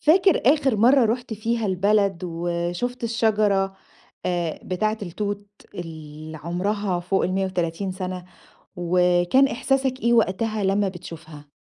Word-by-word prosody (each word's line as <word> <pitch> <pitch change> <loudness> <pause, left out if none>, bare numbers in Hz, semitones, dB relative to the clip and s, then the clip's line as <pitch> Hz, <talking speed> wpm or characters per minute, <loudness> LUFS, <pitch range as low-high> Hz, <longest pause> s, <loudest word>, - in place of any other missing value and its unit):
فاكر 370 +3 +4
آخر 270 -7 0
مرّة 245 +4 +5
رُحت 240 +1 -1
فيها 225 +1 -1
البلد 200 0 +2
وشُفت 175 +8 -3
الشجرة 210 -4 +1 0.5
آآ 175 -3 -1
بتاعة 215 +4 -1
التوت 205 +2 -4 0.3
اللي 155 -2 -8
عُمرها 185 +2 -1
فوق 185 +2 0
ال130 185 -1 -1
سَنة؟ 185 -1 -5 0.5
وكان 180 +8 +3
إحساسك 270 -2 0
إيه 235 0 +2
وقتها 215 0 +1
لمّا 195 +1 +2
بتشوفها؟ 160 -5 -10
195 Hz, 115 wpm, -23 LUFS, 175-220 Hz, 0.5 s, مرّة